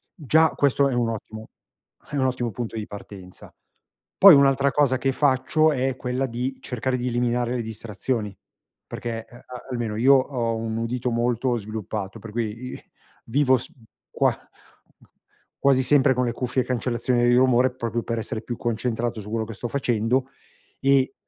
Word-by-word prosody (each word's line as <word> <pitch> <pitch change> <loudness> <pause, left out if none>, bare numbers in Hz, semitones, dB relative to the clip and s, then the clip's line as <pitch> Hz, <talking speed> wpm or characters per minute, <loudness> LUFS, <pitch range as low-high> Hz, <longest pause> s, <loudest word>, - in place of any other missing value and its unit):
Già 160 - +3
questo 140 0 +2
è - - -2
un 120 -1 +1
ottimo 110 0 -7 0.6
è 145 - -5
un 130 - +2
ottimo 125 -2 -1
punto 115 +2 -5
di 105 - -5
partenza. 100 -2 -11 0.6
Poi 195 -5 +10
un'altra 140 0 +4
cosa 140 -3 +2
che 135 - +1
faccio 150 +3 +2
è 130 -1 -1
quella 130 +2 -2
di 125 +3 -3
cercare 125 +1 -2
di 125 0 -3
eliminare 120 0 0
le 120 - -1
distrazioni, 110 -1 -4 0.5
perché 115 -1 -5
a 120 - -16 0.3
almeno 115 -4 -3
io 130 +5 +5
ho 125 -3 0
un 110 0 -3
udito 120 +2 -2
molto 120 +1 0
sviluppato, 110 -1 -5
per 110 +1 -10
cui 115 +2 -4
i - - -10 0.4
vivo 130 +2 +3
s - - -5 0.4
qua - - +2 0.5
g - - -27 0.5
quasi 135 -2 +4
sempre 135 0 +4
con 125 - +1
le 120 - -1
cuffie 125 +1 -1
e - - -14
cancellazione 120 0 0
dei 120 0 +4
rumore 130 0 +4
proprio 115 -2 -3
per 115 -1 -3
essere 110 0 -4
più 120 - -5
concentrato 120 0 -2
su 105 - -11
quello 110 0 -2
che 115 - -8
sto 120 - -4
facendo 125 0 0 0.5
e 135 0 +3
120 Hz, 170 wpm, -24 LUFS, 115-130 Hz, 0.6 s, Poi